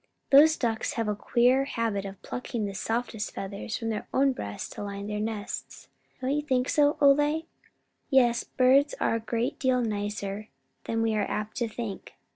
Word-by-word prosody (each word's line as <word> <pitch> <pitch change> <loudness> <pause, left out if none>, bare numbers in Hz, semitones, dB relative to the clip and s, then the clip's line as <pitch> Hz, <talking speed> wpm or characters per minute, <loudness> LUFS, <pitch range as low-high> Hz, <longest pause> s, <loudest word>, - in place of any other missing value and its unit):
"Those 310 +3 +7
ducks 225 -3 -1
have 230 -2 -1
a 210 - 0
queer 250 +5 +3
habit 225 -6 -2
of 195 -1 -8
plucking 240 -3 -4
the 200 - -4
softest 225 +1 -3
feathers 200 +2 -4
from 225 -2 -3
their 215 -2 -3
own 275 +1 +3
breasts 100 - -5
to - - -6
line 200 0 -5
their 210 0 -3
nests. 215 -1 -5 0.3
Don't 260 +1 0
you 295 +1 +1
think 260 -3 0
so, 290 -1 +3
Ole?" 295 +3 +4 0.6
"Yes, 240 -4 +4
birds 270 +3 +3
are - - +1
a 230 - 0
great 230 +2 -2
deal 255 -1 +2
nicer 205 -1 -3 0.4
than 225 0 0
we 225 -1 +1
are 215 - 0
apt 210 0 -3
to 235 - 0
think. 220 -3 -6
230 Hz, 180 wpm, -28 LUFS, 210-260 Hz, 0.6 s, Those